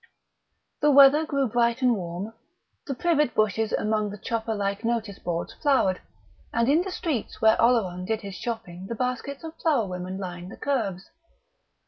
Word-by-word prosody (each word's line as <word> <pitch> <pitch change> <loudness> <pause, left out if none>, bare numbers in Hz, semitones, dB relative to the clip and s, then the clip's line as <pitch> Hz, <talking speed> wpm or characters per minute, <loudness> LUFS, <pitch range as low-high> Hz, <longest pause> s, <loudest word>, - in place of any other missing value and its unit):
The 295 - +4
weather 285 +2 +7
grew 275 -3 +1
bright 235 +2 +1
and 245 -2 +4
warm. 180 +3 -5 0.5
The 275 - -2
privet 300 -4 +1
bushes 215 +1 +1
among 215 -1 0
the 205 - -7
chopper 225 +1 -2
like 200 +1 -2
notice 225 -3 -2
boards 170 -1 -3
flowered, 265 -11 +2 0.5
and 230 0 +1
in 300 +5 +4
the 380 - -4
streets 320 - -3
where 220 0 +5
Oleron 200 -7 +2
did 220 +2 -1
his 200 -2 -7
shopping 185 -2 -6
the 230 - -4
baskets 255 +5 -3
of 320 -1 -6
flower 285 -9 +2
women 185 0 -5
lined 180 -1 -6
the - - -10
kerbs. 210 -10 -2
225 Hz, 165 wpm, -26 LUFS, 195-270 Hz, 0.5 s, weather